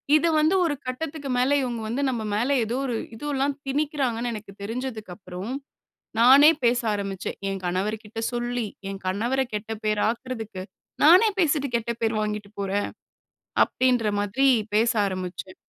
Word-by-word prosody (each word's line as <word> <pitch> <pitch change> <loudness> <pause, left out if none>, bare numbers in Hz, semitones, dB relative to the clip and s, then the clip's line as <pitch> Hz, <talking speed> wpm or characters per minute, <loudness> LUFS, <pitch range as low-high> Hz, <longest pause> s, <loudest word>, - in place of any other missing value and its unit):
இது 330 +2 +4
வந்து 315 +5 +3
ஒரு 305 -3 0
கட்டத்துக்கு 280 +2 -4
மேல 250 +3 +2
இவுங்க 240 -3 -3
வந்து 240 +6 -2
நம்ம 235 -3 -2
மேல 245 +7 +1
ஏதோ 230 +2 -2
ஒரு 245 -3 -1 0.2
இது 225 - -11
எல்லாம் 275 +1 0
திணிக்கிறாங்கன்னு 270 -5 -1
எனக்கு 215 -2 -8
தெரிஞ்சதுக்கப்பறம், 210 -3 -5 0.7
நானே 275 +5 +8
பேச 240 +1 +4
ஆரம்பிச்சேன். 195 -2 -4
என் 195 -1 -4
கணவர் 190 +5 -1
கிட்ட 215 +2 -9
சொல்லி, 240 -1 -2 0.2
என் 195 -1 -7
கணவர 235 +8 0
கெட்ட 210 +1 -3
பேராக்குறதுக்கு, 220 -1 -2 0.4
நானே 360 +8 +8
பேசிட்டு 295 -4 +2
கெட்ட 235 0 -3
பேர் 225 0 +1
வாங்கிட்டு 210 -1 -3
போறேன், 200 +1 -1 0.8
அப்படின்ற 250 -3 +1
மாதிரி 205 +7 +2 0.3
பேச 230 +2 +4 0.2
ஆரம்பிச்சேன். 185 0 -5
235 Hz, 140 wpm, -25 LUFS, 205-265 Hz, 0.8 s, நானே